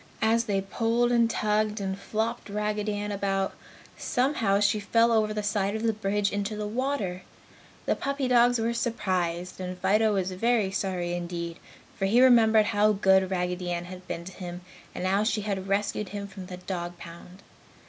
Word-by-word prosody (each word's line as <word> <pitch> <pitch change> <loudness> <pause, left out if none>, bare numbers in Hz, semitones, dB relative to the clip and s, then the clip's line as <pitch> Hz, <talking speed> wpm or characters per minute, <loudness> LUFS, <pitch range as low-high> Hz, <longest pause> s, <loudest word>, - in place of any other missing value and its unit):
As 225 +1 +3
they 200 -3 0
pulled 230 +4 0
and 235 -1 +4
tugged 215 -1 0
and 190 -1 -2
flopped 220 +3 -3
Raggedy 210 0 -1
Ann 205 0 -3
about, 195 -1 -1 0.5
somehow 240 -6 +1
she 205 +1 +2
fell 230 +3 +3
over 215 -2 +2
the 210 0 -3
side 205 0 0
of 220 - -3
the 225 -1 +2
bridge 205 -1 0
into 205 +1 -2
the 210 0 -3
water. 215 -5 -2 0.6
The - - +1
puppy 275 -1 -2
dogs 245 0 +4
were 230 +1 0
surprised, 185 -7 -2
and 180 0 -5
Fido 210 +3 +2
was 190 -1 -1
very 215 +1 +1
sorry 185 -3 -2
indeed, 170 -1 -4 0.4
for 195 - +1
he 230 +5 +4
remembered 225 -4 +6
how 210 +1 +3
good 190 -1 +3
Raggedy 180 -1 -2
Ann 175 0 -2
had 185 0 -10
been 170 - -5
to 190 - -8
him 180 -1 -7 0.3
and 180 - -3
how 195 +2 +2
she 215 -1 0
had 195 -2 -3
rescued 200 0 -1
him 200 0 -5
from 190 -2 -9
the 180 -1 -7
dog 175 -1 -5
pound. 175 +3 -12
205 Hz, 180 wpm, -27 LUFS, 185-220 Hz, 0.6 s, remembered